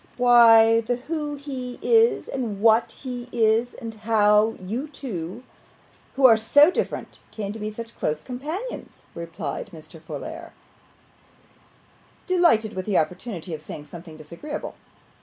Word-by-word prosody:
'Why, 230 -2 +7
the 245 +2 -1
who 295 +3 -4
he 265 -3 -7
is 460 0 +3
and 225 -7 -4
what 225 +2 +4
he 250 -2 -6
is, 225 +1 +1
and 230 -2 -7
how 215 0 +3
you 225 +10 -4
two, 230 - -7 0.7
who 270 -1 +3
are 230 -3 +8
so 290 +9 +5
different, - - -4
came 205 -2 -5
to 225 - -8
be 210 0 -3
such 230 +2 -8
close 150 0 -2
companions,' 310 - -6
replied 165 -3 -6
Mr. 160 -1 -13
Folair, - - -8 1.7
delighted 340 - +3
with 185 +1 -5
the 200 - +2
opportunity 180 +2 -3
of 155 - -6
saying 150 -1 -8
something 165 -1 -11
disagreeable. 170 - -7
225 Hz, 135 wpm, -24 LUFS, 190-255 Hz, 1.7 s, are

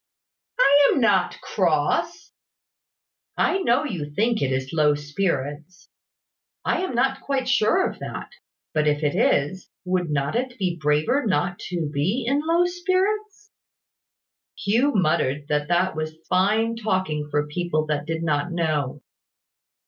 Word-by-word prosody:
"I 285 - +6
am - - +1
not 200 -7 +2
cross." 155 -6 0 1.1
"I 385 - +2
know 260 -5 +2
you 165 - -4
think 225 +3 +1
it 135 -2 0
is 130 +2 -2
low 150 -2 +3
spirits. 145 +1 -3 0.8
I - - +1
am 370 -9 -3
not 265 +2 +1
quite 270 -2 -2
sure 265 - +3
of - - -8
that: - - -7 0.4
but 150 -1 +1
if 150 +1 +1
it 145 - +1
is, 165 +7 +1 0.2
would 180 -2 0
not 140 +4 -1
it 250 +1 -2
be 185 -4 -1
braver 150 - +2
not 180 -1 0
to 170 -3 -2
be 190 - 0
low 315 +6 +2
in - - +1
spirits?" 390 +4 -1 1.1
Hugh 230 +8 +2
muttered 155 -6 +1
that 150 0 0
that 175 +1 +1
was 155 0 -4
fine 215 +5 +2
talking 185 -9 -1
for 150 0 0
people 155 0 -1
that 150 -1 -2
did 165 0 -2
not 155 +1 0
know. 150 -5 -1
180 Hz, 140 wpm, -23 LUFS, 150-245 Hz, 1.1 s, I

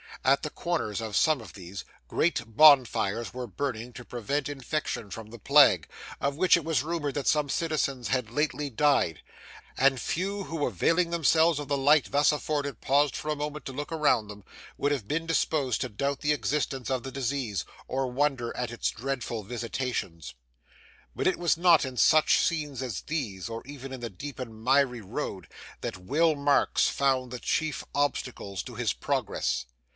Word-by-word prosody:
At 135 +2 +4
the 150 - -2
corners 165 - -2
of 110 -3 -4
some 155 0 +3
of 110 - -12
these, 95 -1 -8 0.2
great 160 - +1
bonfires 125 -7 +5
were 125 -1 -4
burning 120 +2 -4
to 120 - -10
prevent 135 +5 -2
infection 140 -5 -3
from 110 -1 -7
the 120 +1 -11
plague, 140 - +5 0.3
of 140 0 -1
which 185 +4 +5
it 170 - -4
was 155 -5 +1
rumoured 155 -3 -2
that 145 -3 -2
some 150 -2 +2
citizens 140 -6 -1
had 125 -4 -1
lately 150 +1 -1
died; 135 - +2 0.6
and 135 -1 +4
few, 195 +4 -2
who 160 -3 -2
availing 165 - +1
themselves 165 -1 +3
of 145 - -5
the 140 - +1
light 140 -1 +4
thus 145 +2 +4
afforded 145 -1 -2
paused 140 +1 +2
for 155 - -5
a 150 - +1
moment 150 +1 -5
to - - -5
look 145 +3 -5
around 150 -9 +2
them, 105 -1 -10 0.3
would 145 - +1
have 130 -8 -2
been 165 +5 -1
disposed 150 -6 +1
to - - -2
doubt 140 +6 -2
the 150 0 +2
existence 140 -3 -2
of 130 -2 0
the 135 - -6
disease, 125 - -2 0.2
or 135 0 -1
wonder 125 -2 -1
at 125 -2 -2
its 120 - -1
dreadful 120 -3 -4
visitations. 115 - -4 0.8
But - - 0
it 185 - +2
was 175 -2 +2
not 170 -2 +5
in 130 -1 -7
such 155 +4 +5
scenes 150 -6 -1
as 125 -7 -4
these, 115 - -4
or 115 0 -6
even 135 -1 -8
in 130 - -7
the 120 - -4
deep 140 +9 -8
and 110 -3 -7
miry 130 -2 +3
road, 100 -3 -5 0.3
that - - -4
Will 150 - +2
Marks 140 0 +2
found 130 -3 +1
the 125 - -5
chief 155 +1 -1
obstacles 125 -9 -2
to - - -9
his - - 0
progress. - - -1
135 Hz, 180 wpm, -28 LUFS, 120-150 Hz, 0.8 s, bonfires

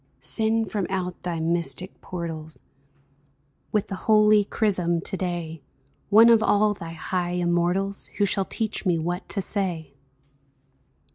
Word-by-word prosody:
Send 220 -2 0
from 200 -5 -1
out 180 -2 -3
thy 175 -2 -3
mystic 170 +2 -1
portals 165 -3 -7 1.1
With 210 -2 +1
the - - -7 0.2
holy 215 -1 +6
chrism 185 -5 +1
to 190 - -4
day, 170 -4 -4 0.5
One 225 +3 +7
of 230 -2 +6
all 210 -1 +3
thy 165 -4 -8
high 175 +1 -2
immortals 180 +3 0
Who 205 - +3
shall 195 0 0
teach 220 +1 -3
me 180 -4 +2
what 175 +3 -3
to 195 -1 -1
say 175 -8 -3
185 Hz, 135 wpm, -25 LUFS, 170-205 Hz, 1.1 s, One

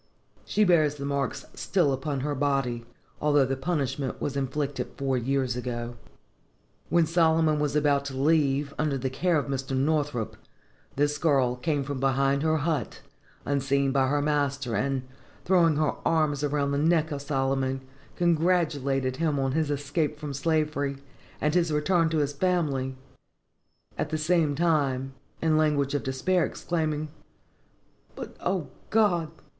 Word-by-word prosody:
She 215 - +2
bears 155 -6 +4
the 140 -1 -6
marks 140 -2 -2
still 170 -8 +1
upon 135 +1 -2
her 145 +2 -1
body 135 -4 0 0.4
although 145 -2 +4
the 135 +1 -1
punishment 135 -3 -2
was 140 - -3
inflicted 140 +1 -2
four 135 -1 0
years 130 0 0
ago. 120 -1 -4 0.9
When 170 +1 +4
Solomon 160 -2 +3
was 150 -1 0
about 145 -2 +2
to 135 -2 -5
leave, 140 -1 +2
under 150 -3 +1
the 130 0 -3
care 170 +5 +1
of 145 - 0
Mr. 135 -1 -2
Northrop, 145 -4 0 0.6
this 145 +1 +1
girl 135 -6 +2
came 145 +2 -1
from 140 -1 -4
behind 135 +1 +2
her 160 0 +2
hut, 150 -6 -2 0.4
unseen 140 0 +1
by 135 -1 +2
her 145 +1 +1
master, 140 -4 0
and, 135 +4 0 0.4
throwing 170 -4 +4
her 155 0 +1
arms 155 -3 +1
around 145 -1 0
the 140 - 0
neck 160 +1 +2
of 140 -1 -3
Solomon, 135 -2 -1 0.3
congratulated 155 -7 +1
him 155 -2 0
on 135 -1 0
his 155 +1 0
escape 145 +2 -1
from 145 -2 -5
slavery, 150 -1 0 0.4
and 150 0 +1
his 170 -2 +2
return 165 +2 +2
to 160 - 0
his 145 -1 0
family; 140 -6 0 1.0
at - - -1
the 155 - -1
same 155 -2 +2
time, 140 -5 +1 0.3
in 160 -1 +3
language 145 -3 +2
of 145 - 0
despair, 165 +7 +1
exclaiming, 155 -3 -2 1.1
"But, - - -8
O 180 -6 -1 0.2
God! 180 -7 +2
145 Hz, 150 wpm, -27 LUFS, 135-155 Hz, 1.1 s, bears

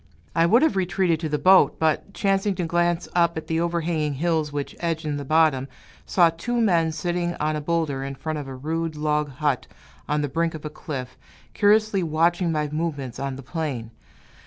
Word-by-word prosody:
I 165 0 +4
would 235 - +5
have 320 - +3
retreated 180 -3 +1
to 160 -1 -3
the 150 - 0
boat, 180 -4 +5
but, 160 +5 0
chancing 195 0 +1
to 175 - -2
glance 175 +1 +1
up 170 -1 +2
at 160 - -4
the 160 0 -1
overhanging 165 -3 -1
hills 160 0 0
which 145 -1 -4
edge 165 -2 -2
in 150 -1 -1
the 145 - -4
bottom, 150 -2 +3 0.4
saw 170 -3 +4
two 240 +9 -2
men 170 -7 +3
sitting 175 +1 -2
on 155 +1 0
a 150 - -3
boulder 150 -4 -1
in 135 0 -5
front 155 +2 -4
of 140 - -7
a 135 - -7
rude 160 +4 -3
log 150 0 0
hut 145 -1 -1 0.4
on 150 0 +1
the - - 0
brink 165 +3 -1
of 155 - -8
a 150 - -4
cliff, 130 -5 -7 0.3
curiously 210 -1 +3
watching 170 +2 +1
my 150 -1 0
movements 145 -5 -3
on 140 -1 -3
the 135 - -9
plain. 130 -6 -4
160 Hz, 200 wpm, -24 LUFS, 150-175 Hz, 0.4 s, would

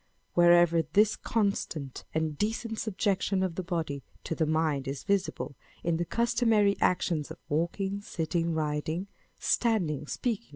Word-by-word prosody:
Wherever 175 -1 +6
this 205 +8 +3
constant 195 - -2
and 160 -1 -1
decent 225 +5 -2
subjection 195 -2 0
of 185 -3 -1
the 185 - -3
body 165 -6 -3 0.2
to - - -3
the 160 -1 0
mind 155 -3 +1
is 135 0 -4
visible 195 -7 -1 0.3
in 170 -1 +1
the 175 - -1
customary 225 -1 +3
actions 170 -4 +1
of - - -8
walking, 190 +6 -1
sitting, 170 -2 -1
riding, 155 +3 -1 0.3
standing, 175 - +1
speaking. 215 - -2
175 Hz, 135 wpm, -29 LUFS, 155-200 Hz, 0.3 s, Wherever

